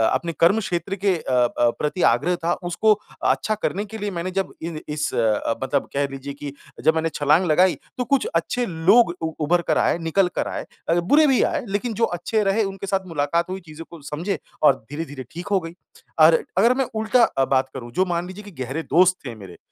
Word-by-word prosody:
अपने 170 -1 -2
कर्मक्षेत्र 180 -1 +2
के 195 -1 +1
अ 155 - -6
अ, 120 -1 +3
प्रति 150 +5 -2
आग्रह 170 +10 +1
था 170 - +2 0.2
उसको 215 +5 +3 0.4
अच्छा 215 - +1
करने 205 +3 -1
के 220 +2 -8
लिए 205 -1 -3
मैंने 175 +1 -4
जब 195 +1 -2
इन 165 -1 -5
इस 150 0 -2
अ, 115 0 +1
मतलब 130 +2 -1
कह 140 0 +1
लीजिए 135 +1 -6
कि 145 0 -7 0.3
जब 160 - +4
मैंने 160 0 0
छलाँग 150 +5 +3
लगाई 180 +4 +4 0.2
तो 250 - 0
कुछ 275 - +1
अच्छे 245 0 0
लोग 180 +3 +4
उ 160 - -2
उभर 175 +3 +2
कर - - +2
आए, - - +2
निकल 175 +3 +1
कर - - -1
आए - - -5 0.2
अ, - - +4
बुरे 295 - +4
भी 265 -3 +3
आए 300 -6 -1
लेक़िन 205 +4 -2
जो 230 +2 +2
अच्छे 215 +5 0
रहे 200 +3 +2
उनके 195 0 -5
साथ 190 0 -1
मुलाक़ात 165 +2 -1
हुई 190 +1 -4
चीज़ों 160 +1 -10
को 170 -2 -12
समझे 165 +8 -3 0.2
और 140 -3 +6
धीरे-धीरे 145 -3 -6
ठीक 175 +1 -7
हो 195 - +4
गई। 165 0 -8 0.5
और 160 +1 +6
अगर 230 +6 +5
मैं 265 0 0
उल्टा 220 +3 +3
अ, 135 -10 +2
बात 130 0 +1
करूँ 120 -3 -8
जो 185 +10 +1
मान 175 -1 -2
लीजिए 190 +3 -9
कि 205 - -11
गहरे 135 +6 -4
दोस्त 180 +1 +4
थे 120 -3 -6
मेरे 95 -4 -12
170 Hz, 220 wpm, -22 LUFS, 150-195 Hz, 0.5 s, और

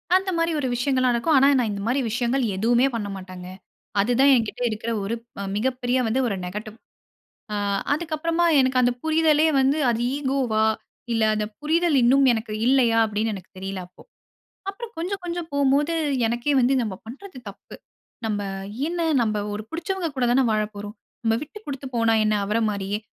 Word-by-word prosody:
அந்த 380 +1 +2
மாரி 330 0 +1
ஒரு 270 - -1
விஷயங்கள்லா 255 +1 +1
நடக்கும். 245 +7 +2
ஆனா, 270 +1 +6
நான் 235 -3 0
இந்த 200 -1 -4
மாரி 255 +4 +1
விஷயங்கள் 240 +3 0
எதுவுமே 235 +6 +3
பண்ணமாட்டேன்ங்க. 190 -4 -6 0.5
அது 205 +5 +2
தான் 275 +1 +6
எங்கிட்ட 230 -1 -2
இருக்குற 225 +1 -4
ஒரு 210 +4 -2 0.4
மிக 215 +5 +1
பெரிய 245 +1 +1
வந்து 230 +4 +1
ஒரு 205 - -1
நெகட்டிவ். 210 +4 -6 0.8
ஆ - - -1 0.4
அதுக்கப்புறமா 330 +2 0 0.2
எனக்கு 260 -1 +2
அந்த 245 0 +3
புரிதலே 315 -1 +3
வந்து, 270 +3 +2
அது 230 -1 -1 0.2
ஈகோவா 260 -6 0 0.5
இல்ல 225 -1 +2
அந்த 215 0 -1
புரிதல் 320 +1 +2
இன்னும் 270 +3 +5
எனக்கு 220 -1 -3
இல்லையா. 245 -3 +4
அப்பிடீன்னு 215 +1 -1
எனக்கு 190 -2 -10
தெரியல, 195 0 -5
அப்போ. 180 - -18 0.7
அப்புறம் 455 +3 -8
கொஞ்சம் 370 +4 -3
கொஞ்சம் 345 -1 -4
போகும்போது, 285 +3 +2 0.3
எனக்கே 240 +5 0
வந்து 250 +2 +3
நம்ம 215 -4 -3
பண்றது 275 - -10
தப்பு. 200 - -13 0.5
நம்ம 210 -2 -1 0.5
என்ன 345 +1 -3 0.2
நம்ம 215 -2 0
ஒரு 210 +1 -5
புடுச்சவங்க 345 +1 -3
கூட 250 - +2
தான 260 +1 +4
வாழப் 215 0 -1
போறோம். 205 +1 -7 0.3
நம்ம 225 -1 +2
விட்டு 310 +8 -11
குடுத்து 275 -1 -5
போனா 230 -1 +3
என்ன? 215 - +2
அவர 210 +3 0
மாரியே. 200 0 -3
245 Hz, 170 wpm, -24 LUFS, 215-295 Hz, 0.8 s, ஆனா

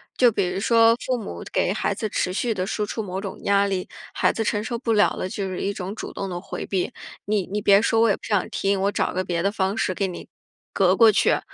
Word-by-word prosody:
就 245 -2 +5
比 200 -4 0
如 180 +2 -3
说 230 +2 +5
父 255 - 0
母 220 - -7
给 - - +1
孩 - - -1
子 220 - -2
持 185 - -1
续 225 +5 -1
地 185 -2 -3
输 210 0 -1
出 220 - -4
某 190 -2 -4
种 195 -1 -6
压 200 0 +3
力， 190 -2 -2 0.2
孩 - - +2
子 225 - -2
承 210 -1 -1
受 235 +2 -3
不 230 -1 -1
了 210 -1 +4
了， - - -3
就 195 +1 -4
是 185 -1 -5
一 200 - -1
种 195 +1 -5
主 - - -7
动 195 - -4
地 175 -1 -4
回 175 - -6
避。 190 -2 -1 0.3
你 205 -3 0
你 205 +2 -2
别 200 -1 +5
说， 225 0 +2
我 230 - +4
也 200 - +3
不 - - -19
想 205 -4 0
听， 200 -2 0
我 200 - +2
找 - - 0
个 185 - 0
别 175 -2 -2
的 200 +3 +1
方 195 -1 -1
式 185 -4 -1
给 195 - 0
你， 180 - -8 0.4
隔 185 -1 +3
过 225 +1 +7
去。 - - +2
200 Hz, 285 characters per minute, -23 LUFS, 190-220 Hz, 0.4 s, 过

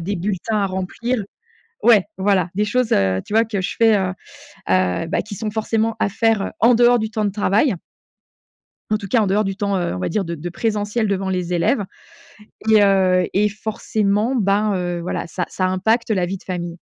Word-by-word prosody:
des 195 +4 -3
bulletins 205 +4 -2
à 200 - +1
remplir. 195 +6 -3 0.6
Ouais, 215 -6 +6
voilà. 190 -2 +1
Des 210 +2 +1
choses, 250 +3 0
heu, 95 -1 +2
tu - - -8
vois, 225 +1 +4
que 210 -3 -3
je 185 - -3
fais, 225 -2 +5
heu, 185 -1 -1 0.6
heu, 95 - +1
bah, 175 - 0
qui 210 -1 -8
sont 215 +2 -4
forcément 220 +1 -1
à - - +1
faire, 220 0 +1
heu, - - -3
en 240 +2 +6
dehors 240 +1 +5
du 220 0 -3
temps 220 -1 -2
de 205 - +1
travail. 210 +4 +2 1.2
En 215 - +3
tout 200 - -7
cas, 230 +4 +3
en 210 - +1
dehors 205 +3 +2
du 195 -1 -3
temps, 200 -1 -1
heu, 175 - -2
on - - -5
va 90 - -2
dire 200 +3 -1
de 170 -1 -4
de 165 +3 -6
présentiel 210 +3 -1
devant 195 -1 -1
les 180 -1 -2
élèves 200 +5 +1 0.9
et, 215 -1 +6
heu 185 -2 +3
et 210 +2 +3
forcément, 215 +2 -1
ben, 205 -1 +2
heu, 175 -1 -2
voilà, 170 - -4
ça 180 0 -3
ça 185 - -1
impacte 220 +6 +1
la 185 -4 +1
vie 190 +2 -4
de - - -20
famille. 175 -2 -5
200 Hz, 215 wpm, -20 LUFS, 185-220 Hz, 1.2 s, Ouais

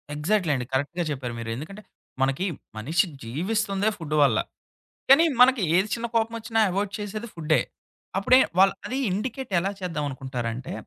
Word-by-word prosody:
Exactly 170 +2 +1
అండి. 125 -2 -3
కరెక్ట్‌గా 145 +6 -1
చెప్పారు 130 -4 -4
మీరు. 115 0 -5
ఎందుకంటే 160 - -8 0.4
మనకి 135 +7 +1 0.3
మనిషి 155 - +1 0.2
జీవిస్తుందే 195 - 0
ఫుడ్డు 155 -4 -3
వల్ల. 120 -6 +3 0.7
కానీ 280 +5 +8 0.2
మనకి 255 -1 +6
ఏది 190 +3 +3
చిన్న 235 0 -3
కోపం 225 0 +1
ఒచ్చినా 225 0 -1
అవాయిడ్ 195 +2 -1
చేసేది 210 +2 -5
ఫుడ్డే. 155 -2 +2 0.6
అప్పుడే 250 +7 +5 0.2
వాళ్ళు 195 +1 +6
అది 260 - -3
ఇండికేట్ 235 +5 -4
ఎలా 195 +3 -1
చేద్దామనుకుంటారంటే 135 -7 -4
180 Hz, 145 wpm, -25 LUFS, 140-215 Hz, 0.7 s, కానీ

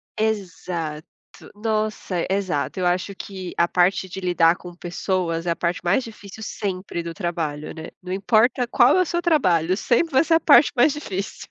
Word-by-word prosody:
Exato. 175 -7 -3 0.5
Nossa, 215 -4 -2
exato. 190 -5 -1
Eu 180 - 0
acho 180 +3 -1
que 190 -2 -7
a 170 - +3
parte 180 +1 +1
de 190 - -6
lidar 175 -2 +3
com 175 -1 -11
pessoas 175 -1 -2
é 170 - +1
a 170 - 0
parte 170 0 -1
mais 195 +9 +2
difícil 215 -1 -11
sempre 185 -4 -4
do 170 0 -6
trabalho, 165 -5 -4
né, 160 -1 -8
não 180 0 -8
importa 220 +6 +2
qual 245 +6 +4
é - - +4
o 365 - +2
seu 345 +2 -1
trabalho, 185 - +2
sempre 280 +8 +1
vai 265 - +5
ser 330 - +1
a - - +4
parte 300 - +6
mais 255 +4 +5
difícil. 200 -10 -6
185 Hz, 185 wpm, -22 LUFS, 175-220 Hz, 0.5 s, parte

